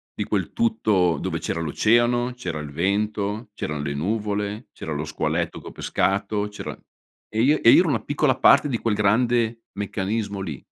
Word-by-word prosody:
di -, -, -2 dB
quel -, -, -2 dB
tutto, 105 Hz, -, +1 dB
dove -, -, -2 dB
c'era -, -, -3 dB
l'oceano, 120 Hz, +9 st, +2 dB
c'era 90 Hz, -10 st, -5 dB
il 75 Hz, -1 st, -7 dB
vento, 105 Hz, +5 st, -1 dB
c'erano 75 Hz, -7 st, -4 dB
le 70 Hz, -1 st, -2 dB
nuvole, 105 Hz, -, -2 dB
c'era 80 Hz, -, -7 dB
lo 75 Hz, +1 st, -3 dB
squaletto 80 Hz, +2 st, -2 dB
che -, -, -12 dB
ho -, -, -7 dB
pescato, 100 Hz, +2 st, -1 dB
c'era 105 Hz, 0 st, -7 dB, 0.6 s
e 110 Hz, +1 st, 0 dB
io 150 Hz, +4 st, +4 dB
e -, -, +7 dB
io -, -, +8 dB
ero 175 Hz, -, 0 dB
una 125 Hz, -6 st, 0 dB
piccola 145 Hz, -2 st, +1 dB
parte 130 Hz, +3 st, +5 dB
di 120 Hz, -5 st, -2 dB
quel 115 Hz, -2 st, 0 dB
grande 115 Hz, +2 st, +2 dB
meccanismo 100 Hz, +1 st, -3 dB
lì. 80 Hz, -9 st, -6 dB
105 Hz, 180 wpm, -23 LUFS, 90-120 Hz, 0.6 s, io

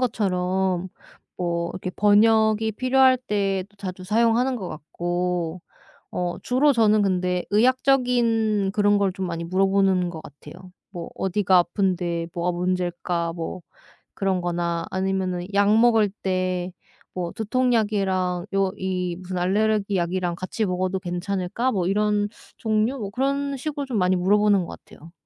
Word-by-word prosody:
것처럼 190 Hz, -5 st, 0 dB, 0.5 s
뭐 170 Hz, -1 st, -2 dB
이렇게 185 Hz, 0 st, -5 dB
번역이 220 Hz, +2 st, +3 dB
필요할 260 Hz, +3 st, +4 dB
때도 200 Hz, -4 st, -2 dB
자주 185 Hz, -2 st, -7 dB
사용하는 230 Hz, +5 st, +2 dB
것 195 Hz, -6 st, -5 dB
같고 175 Hz, +2 st, -3 dB, 0.5 s
어 175 Hz, -1 st, -2 dB
주로 275 Hz, +4 st, +3 dB
저는 215 Hz, -4 st, +3 dB
근데 180 Hz, -2 st, 0 dB
의학적인 230 Hz, -3 st, +2 dB
그런 205 Hz, 0 st, +3 dB
걸 200 Hz, -2 st, +1 dB
좀 190 Hz, 0 st, -4 dB
많이 170 Hz, 0 st, -4 dB
물어보는 190 Hz, 0 st, +2 dB
것 160 Hz, -2 st, -8 dB
같아요. 170 Hz, +6 st, -13 dB, 0.2 s
뭐 175 Hz, -3 st, -7 dB
"어디가 190 Hz, -1 st, +2 dB
아픈데 175 Hz, -2 st, 0 dB
뭐가 175 Hz, +1 st, 0 dB
문제일까." 175 Hz, -1 st, -1 dB
뭐 170 Hz, +2 st, -5 dB, 0.5 s
그런 190 Hz, -2 st, 0 dB
거나 170 Hz, -1 st, -2 dB
아니면은 185 Hz, -1 st, -1 dB
"약 205 Hz, +2 st, +4 dB
먹을 225 Hz, -2 st, +4 dB
때 185 Hz, -1 st, -1 dB, 0.4 s
뭐 175 Hz, -2 st, -3 dB
두통약이랑 205 Hz, -6 st, 0 dB
요 195 Hz, -1 st, +1 dB
이 180 Hz, -2 st, -2 dB
무슨 185 Hz, 0 st, -6 dB
알레르기 205 Hz, +2 st, +1 dB
약이랑 175 Hz, 0 st, -1 dB
같이 185 Hz, +5 st, -3 dB
먹어도 185 Hz, 0 st, -1 dB
괜찮을까?" 185 Hz, +6 st, -2 dB
뭐 185 Hz, -6 st, -1 dB
이런 205 Hz, +1 st, +1 dB, 0.3 s
종류? 220 Hz, +3 st, 0 dB
뭐 205 Hz, -4 st, -5 dB
그런 275 Hz, +4 st, -1 dB
식으로 290 Hz, +1 st, -4 dB
좀 255 Hz, -5 st, -2 dB
많이 185 Hz, 0 st, +2 dB
물어보는 205 Hz, +2 st, +3 dB
것 -, -, -9 dB
같아요. 165 Hz, +2 st, -15 dB
190 Hz, 290 characters per minute, -24 LUFS, 180-215 Hz, 0.5 s, 필요할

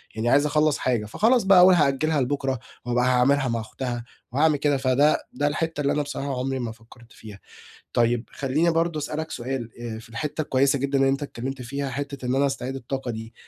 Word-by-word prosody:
يعني 110 Hz, +2 st, 0 dB
عايِز 145 Hz, +3 st, +4 dB
أخلَص 150 Hz, 0 st, +2 dB
حاجة، 120 Hz, -4 st, 0 dB
فخلاص 225 Hz, -, +2 dB
بقى، 195 Hz, -1 st, +6 dB
أقول: 185 Hz, +1 st, +8 dB
"هأجِلها 150 Hz, 0 st, +2 dB
لبُكرة 135 Hz, 0 st, -1 dB, 0.3 s
وأبقى 125 Hz, 0 st, +1 dB
هاعمَلها 130 Hz, +2 st, +3 dB
مع 115 Hz, -1 st, -1 dB
أُختها 120 Hz, +2 st, -5 dB, 0.3 s
وهاعمل 150 Hz, +3 st, +3 dB
كده." 145 Hz, 0 st, +1 dB
فده 135 Hz, +3 st, +2 dB
ده 145 Hz, +3 st, 0 dB
الحتَّة 160 Hz, +1 st, -2 dB
اللي 140 Hz, -, +1 dB
أنا 150 Hz, -, +1 dB
بصراحة 140 Hz, -2 st, -4 dB
عمري 135 Hz, +1 st, -2 dB
ما 120 Hz, -2 st, -3 dB
فكرت 115 Hz, +1 st, -17 dB
فيها. 105 Hz, -2 st, -12 dB, 0.5 s
طيب 120 Hz, 0 st, +2 dB
خلِّيني 145 Hz, +5 st, +1 dB
برضه 165 Hz, -1 st, 0 dB
أسأَلَك 155 Hz, +2 st, -4 dB
سؤال، 120 Hz, -1 st, -4 dB
آآ 115 Hz, -2 st, -5 dB
في 115 Hz, -, -13 dB
الحتَّة 145 Hz, +7 st, -4 dB
الكويِسة 140 Hz, 0 st, +2 dB
جدًا 140 Hz, +1 st, 0 dB
إن 135 Hz, -, +4 dB
أنتَ 135 Hz, +1 st, +1 dB
اتكلَّمت 135 Hz, -1 st, -5 dB
فيها، 140 Hz, +3 st, -4 dB
حتَّة 140 Hz, 0 st, -5 dB
إن 125 Hz, -, 0 dB
أنا 140 Hz, +1 st, +3 dB
أستعيد 135 Hz, -1 st, -3 dB
الطاقة 135 Hz, 0 st, -4 dB
دي. 115 Hz, 0 st, -7 dB
135 Hz, 200 wpm, -24 LUFS, 120-145 Hz, 0.5 s, أقول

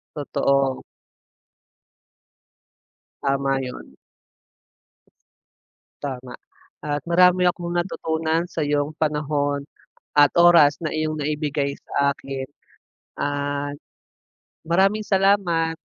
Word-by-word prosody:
Totoo. 140 Hz, -2 st, 0 dB, 2.4 s
Tama 135 Hz, -1 st, 0 dB
yun. 125 Hz, -1 st, -8 dB, 2.1 s
Tama 130 Hz, -2 st, -5 dB, 0.5 s
at 145 Hz, -1 st, -2 dB
marami 180 Hz, +1 st, +5 dB
akong 175 Hz, 0 st, -4 dB
natutunan 165 Hz, -2 st, -1 dB
sayong 150 Hz, -3 st, -1 dB
panahon 145 Hz, -2 st, -1 dB, 0.5 s
at 145 Hz, -1 st, +6 dB
oras 170 Hz, -4 st, +6 dB
na 155 Hz, -, -2 dB
iyong 155 Hz, -1 st, -2 dB
naibigay 145 Hz, -1 st, -2 dB
sa 140 Hz, 0 st, -1 dB
akin 135 Hz, -1 st, -6 dB, 0.7 s
at 145 Hz, 0 st, -2 dB, 0.9 s
maraming 195 Hz, +5 st, +2 dB
salamat. 190 Hz, -5 st, +2 dB
150 Hz, 75 wpm, -23 LUFS, 140-170 Hz, 2.4 s, at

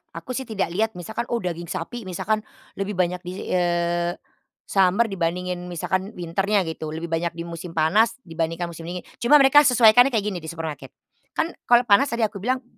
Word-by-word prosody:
Aku 255 Hz, -, -7 dB
sih 260 Hz, 0 st, -4 dB
tidak 205 Hz, -6 st, -2 dB
lihat 220 Hz, +4 st, 0 dB
misalkan 220 Hz, +7 st, -5 dB
oh 240 Hz, -, -1 dB
daging 170 Hz, -1 st, -4 dB
sapi 205 Hz, +7 st, -5 dB
misalkan, 215 Hz, +4 st, -1 dB, 0.4 s
lebih 195 Hz, +1 st, -2 dB
banyak 180 Hz, 0 st, 0 dB
di 180 Hz, 0 st, -8 dB, 0.2 s
eee, 175 Hz, -1 st, +1 dB, 0.5 s
summer 195 Hz, +3 st, +3 dB
dibandingin 180 Hz, 0 st, -2 dB
misalkan 190 Hz, +4 st, -3 dB
winter-nya 195 Hz, +4 st, 0 dB
gitu, 160 Hz, -2 st, -5 dB
lebih 165 Hz, +1 st, -6 dB
banyak 165 Hz, +1 st, -1 dB
di 170 Hz, -, -5 dB
musim 170 Hz, 0 st, -8 dB
panas 210 Hz, +9 st, +3 dB
dibandingkan 165 Hz, +1 st, -3 dB
musim 165 Hz, 0 st, -9 dB
dingin. 180 Hz, 0 st, -5 dB, 0.2 s
Cuma 245 Hz, +5 st, +5 dB
mereka 285 Hz, +1 st, +7 dB
sesuaikannya 245 Hz, +1 st, +6 dB
kayak 210 Hz, -, +2 dB
gini 180 Hz, -, -4 dB
di 160 Hz, -, -10 dB
supermarket, 160 Hz, -2 st, -6 dB, 0.4 s
kan 330 Hz, -, 0 dB, 0.2 s
kalau 240 Hz, 0 st, +6 dB
panas 235 Hz, +4 st, +4 dB
tadi 235 Hz, -3 st, -1 dB
aku 210 Hz, -2 st, -1 dB
bilang, 255 Hz, +5 st, -1 dB
180 Hz, 185 wpm, -23 LUFS, 170-220 Hz, 0.5 s, mereka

